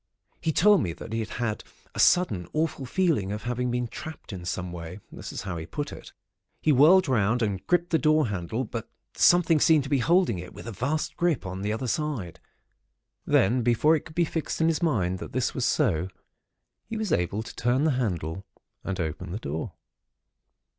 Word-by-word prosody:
He 160 - +1
told 205 +5 +5
me 85 -4 -2
that 110 - -9
he 115 0 0
had 110 0 -3 0.3
a - - -6
sudden 130 - +3
awful 155 -4 -1
feeling 150 - +1
of 105 +1 -4
having 125 +1 -1
been 125 0 -1
trapped 155 -2 -8
in 90 -2 -7
some 90 0 -3
way—that 85 +3 -8
is - - -5
how 95 -3 -4
he 80 0 -6
put 145 - -4
it. - - -11 0.5
He 155 - +2
whirled 160 +8 +6
round, 115 -1 +2
and 100 -3 -2
gripped 175 0 +1
the 160 - +3
door 155 -2 +3
handle; 100 +5 -2
but 115 -1 -6 0.3
something 170 -3 +5
seemed 155 -1 +5
to 135 - -8
be 140 - +3
holding 165 - +3
it 90 +1 -9
with - - -10
a 115 - -5
vast 130 +10 -2
grip 170 - +1
on 95 0 -5
the 105 +1 -1
other 110 +4 -2
side. 125 - -2 0.9
Then, 120 +6 +3
before 120 +7 +4
it 155 - -2
could 155 - -12
be 170 0 +3
fixed 160 -1 -3
in 160 0 +3
his 160 0 0
mind 95 - +1
that - - -8
this 125 0 0
was 130 - -1
so, 95 - +1 0.8
he 225 - -4
was 215 -5 -2
able 90 - 0
to - - -10
turn 125 +4 +1
the 160 - +3
handle, 95 - -2 0.4
and 95 -1 -4
open 80 -3 -3
the 95 - -3
door. 80 -6 -4
120 Hz, 200 wpm, -26 LUFS, 95-155 Hz, 0.9 s, whirled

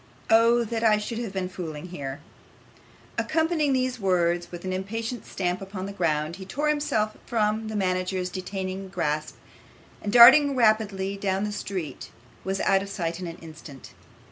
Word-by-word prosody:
Oh! 230 +1 +5
that 230 0 -3
I 215 -2 +5
should 225 +2 -4
have 230 -4 -4
been 190 -1 -2
fooling 175 -3 -7
here!' 140 -4 -6 1.0
Accompanying 320 -2 +1
these 255 -1 0
words 175 -3 +1
with 175 +1 -8
an 185 - -2
impatient 225 +4 -4
stamp 180 0 -2
upon 190 -1 -6
the 200 - -5
ground, 160 -3 -1
he 190 - -8
tore 295 +9 -1
himself 225 -8 0
from 220 -1 0
the 220 - -5
manager's 185 -1 -1
detaining 190 +1 -5
grasp, 155 -4 -2 0.7
and 205 - -3
darting 265 +5 +8
rapidly 210 -4 +2
down 195 0 -1
the 210 - -2
street 185 -9 -5 0.3
was 190 0 -2
out 195 0 +3
of 200 - -6
sight 170 -3 -3
in 180 - -5
an 165 - -7
instant. 155 -4 -11
195 Hz, 165 wpm, -26 LUFS, 180-225 Hz, 1.0 s, darting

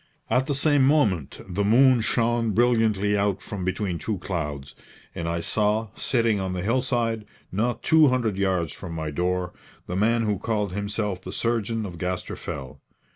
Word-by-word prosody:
At 130 +3 +2
the 145 - 0
same 145 0 +3
moment 110 - +2
the 95 +2 -1
moon 125 +3 +5
shone 115 -1 +1
brilliantly 110 -3 +2
out 100 -1 +1
from 100 -3 -5
between 95 -1 -2
two 110 -3 -2
clouds, 75 -7 -4 0.4
and 85 0 -3
I 85 0 -1
saw, 105 +4 0
sitting 115 -5 +1
on 95 -1 -2
the 90 -1 -3
hillside, 115 -1 0 0.3
not 115 +6 -1
two 160 -1 +6
hundred 120 -6 +1
yards 95 -5 0
from 90 -4 -8
my 80 -2 -3
door, 90 +3 -1 0.3
the 90 - -4
man 115 +4 +2
who 105 -3 0
called 105 -3 -1
himself 105 -1 -2
the - - -7
surgeon 115 -1 -1
of 85 -4 -8
Gaster 90 +1 -3
Fell. 65 -2 -7
105 Hz, 170 wpm, -25 LUFS, 90-115 Hz, 0.4 s, two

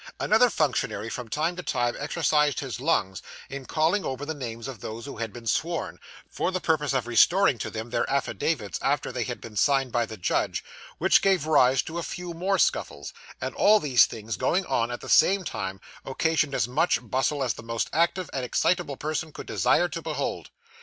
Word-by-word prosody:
Another 225 +3 +4
functionary, 120 - -1
from 125 +1 -5
time 160 +8 -1
to - - -3
time, 120 -7 -1
exercised 150 -2 +1
his 130 -4 -5
lungs 125 - 0 0.3
in 135 -1 -7
calling 165 +5 +1
over 135 +2 -4
the 160 - -3
names 115 -5 -6
of 130 -5 -7
those 110 +5 -7
who 140 - -8
had 115 -1 -4
been 120 +2 -11
sworn, 165 +9 -1 0.3
for - - -2
the 185 - -1
purpose 155 -4 +1
of 130 -3 0
restoring 130 - +4
to - - -3
them 115 +1 -6
their - - 0
affidavits 135 - -1
after - - 0
they - - -2
had - - -5
been 110 -2 -11
signed 135 +2 +2
by 120 -1 0
the 110 - -8
judge, 90 - -1 0.3
which - - +4
gave 190 -6 +2
rise 135 -4 +4
to 165 +2 -5
a - - -2
few 175 +1 -6
more 190 +4 0
scuffles; - - -1 0.3
and - - -4
all 215 +1 +5
these 125 - +5
things 110 -2 -6
going 185 - +1
on 115 -6 0
at 120 - -5
the - - -9
same 195 0 +4
time, 95 - -4 0.2
occasioned 150 +1 0
as 110 - +1
much 155 +8 +2
bustle 135 +4 0
as 125 - 0
the - - -10
most 115 0 -2
active 170 +2 +1
and 135 - -2
excitable 150 +3 0
person 155 +1 -3
could - - -9
desire - - +2
to - - -6
behold. - - -3
140 Hz, 200 wpm, -26 LUFS, 120-165 Hz, 0.3 s, all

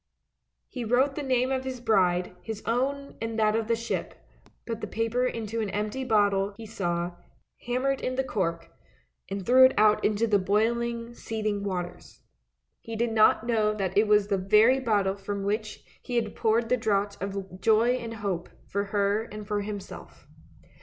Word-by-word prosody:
" - - -54 0.2
He 250 - -6
wrote 250 +5 +2
the 295 - -4
name 255 -1 +1
of 260 -1 -1
his 260 -1 -5
bride, 185 -6 +1
his 220 -2 -6
own, 275 +4 -1
and 225 0 -3
that 215 -1 +3
of 225 -1 -1
the 230 - +2
ship, 230 +1 -4 0.5
put 230 -1 -4
the - - -3
paper 230 +3 0
into 225 -1 -3
an 210 - -2
empty 210 +6 -2
bottle 205 -4 +2
he 225 - -8
saw, 175 -4 -3 0.5
hammered 265 +2 0
in 255 - -2
the 265 - +1
cork, 170 -9 -2 0.6
and 195 -1 -4
threw 255 +2 +7
it 260 - +6
out 210 0 +4
into 215 +2 +2
the 210 -3 +3
boiling, 230 +4 0
seething 215 -3 -3
waters. 180 -3 -5 0.6
He 230 - -7
did 235 +1 0
not 220 0 +4
know 215 -3 +1
that 190 -3 -2
it 210 +1 +4
was 210 -1 +4
the 200 -1 0
very 215 +7 +5
bottle 205 -6 +1
from 200 0 -4
which 210 +1 -3 0.2
he 245 - -5
had 225 -3 -1
poured 225 +1 +1
the 250 - +3
draught 205 -3 -1
of 195 -1 -5
joy 225 +3 +4
and 230 -2 -6
hope 195 -5 -3 0.2
for 200 +1 -2
her 205 +2 0
and 210 -1 -8
for 210 -1 -1
himself. 205 -1 -8
215 Hz, 180 wpm, -27 LUFS, 200-235 Hz, 0.6 s, threw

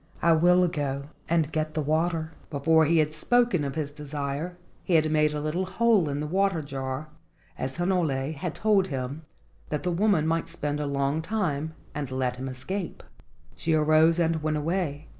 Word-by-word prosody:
I 170 - +5
will 180 +2 +5
go 140 -4 -3 0.2
and 160 -2 +2
get 155 -1 -2
the 155 - +1
water." 160 +1 0 0.2
Before 160 +2 +3
he 165 +2 +3
had 155 -1 +2
spoken 235 0 +2
of 140 0 -3
his 150 -3 -2
desire 145 +3 -4 0.3
he 175 - +1
had 155 -1 +3
made 150 -1 +3
a 150 - -3
little 160 +5 -2
hole 220 -6 +3
in 140 +1 -2
the - - -2
water 185 0 +1
jar, 135 +1 -4 0.5
as 130 0 -3
Hinole 160 -6 0
had 155 +2 -4
told 205 -3 +3
him, 135 +1 -4 0.5
that 150 - -2
the 180 - 0
woman 180 -3 +2
might 165 +1 0
spend 150 -3 -3
a 150 - -2
long 140 +2 0
time 160 -6 -2 0.2
and 150 -3 -4
let 130 -1 -1
him 130 +1 -4
escape. 170 +9 -5 0.5
She 160 - 0
arose 155 +2 +4
and 165 -2 +1
went 155 0 0
away. 155 -2 -2
155 Hz, 180 wpm, -27 LUFS, 145-170 Hz, 0.5 s, I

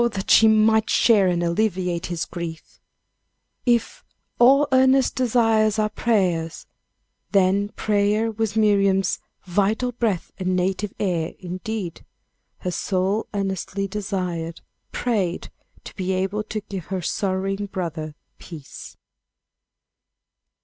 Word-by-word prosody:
that 190 -1 -2
she 225 - +7
might 220 0 +4
share 210 -5 +4
and 175 -1 +1
alleviate 180 -1 0
his 165 -2 -3
griefs. 165 -2 -8 0.9
If 235 -2 +1 0.4
"all 275 +4 +6
earnest 260 0 +4
desires 225 -3 +2
are 215 0 +1
prayers," 180 -8 0 0.7
then 200 +1 +3
prayer 210 +1 +1
was 220 -1 -2
Miriam's 195 -3 +3 0.3
"vital 205 +7 0
breath 225 -7 -2
and 185 0 0
native 190 +3 -1
air" 175 -5 -1
indeed; 185 +1 -5 0.6
her 180 - -2
soul 190 +4 -1
earnestly 195 0 -2
desired, 180 -5 -4 0.3
prayed, 200 -8 -1 0.3
to - - -11
be 190 -3 -2
able 190 +3 -1
to 215 0 -4
give 195 -5 -7
her 185 -2 -4
sorrowing 195 +2 -1
brother 160 -5 -5 0.2
peace. 155 -5 -11
195 Hz, 110 wpm, -23 LUFS, 180-215 Hz, 0.9 s, she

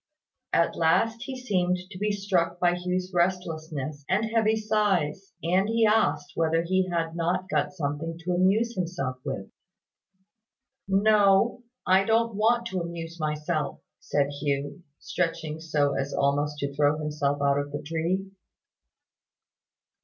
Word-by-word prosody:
At 170 - +2
last 225 +8 +2
he 260 -1 -6
seemed 185 -7 +1
to 185 - -8
be 210 +1 +1
struck 185 -4 0
by 175 -1 +3
Hugh's 180 +1 -2
restlessness 160 -5 -2
and 205 +4 +2
heavy 220 -1 +2
sighs; 200 -5 0
and 185 +5 +2
he 225 0 +3
asked 220 +1 +2
whether 165 0 +1
he 185 +1 +1
had 165 -1 -1
not 175 +2 -1
got - - 0
something 160 0 -3
to 180 +1 -1
amuse 200 +6 +2
himself 165 - -3
with. 115 -9 -5 1.4
"No. 200 +3 +4 0.2
I 190 +1 +5
don't 230 +1 +2
want 230 +3 +2
to 185 -3 -2
amuse 170 0 -6
myself," 155 +1 -2 0.2
said 140 -1 0
Hugh, 145 +4 -2 0.2
stretching 160 -3 -3
so 150 -3 +1
as 135 +1 -2
almost 145 +1 +1
to 140 0 -2
throw 145 +1 +2
himself 150 -2 -1
out 140 0 +2
of 145 0 -4
the 145 - -5
tree. 165 +5 -1
175 Hz, 140 wpm, -27 LUFS, 150-195 Hz, 1.4 s, I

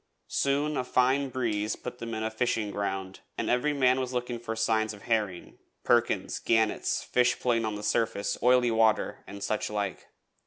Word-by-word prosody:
Soon 145 +2 0
a - - 0
fine 130 +2 +2
breeze 110 -5 -1
put 125 0 -8
them 115 -1 -5
in 110 - -3
the 110 - -1
fishing 110 -2 -1
ground, 95 -2 -3 0.2
and - - -1
every 125 +5 +2
man 130 -2 +3
was 130 -1 -3
looking 125 -1 -2
out - - -14
for 115 -1 -4
signs 110 -1 +1
of 100 - -15
herring 105 -6 -2 0.2
perkins, - - +1
gannets, 110 -2 +1
fish 125 0 +2
playing 115 -2 +1
on 110 -1 -2
the 105 - -7
surface, 105 -2 0
oily 125 -1 +4
water, 110 -1 +2
and 100 0 -8
such 110 - -1
like. 105 -2 -3
115 Hz, 185 wpm, -28 LUFS, 105-125 Hz, 0.2 s, oily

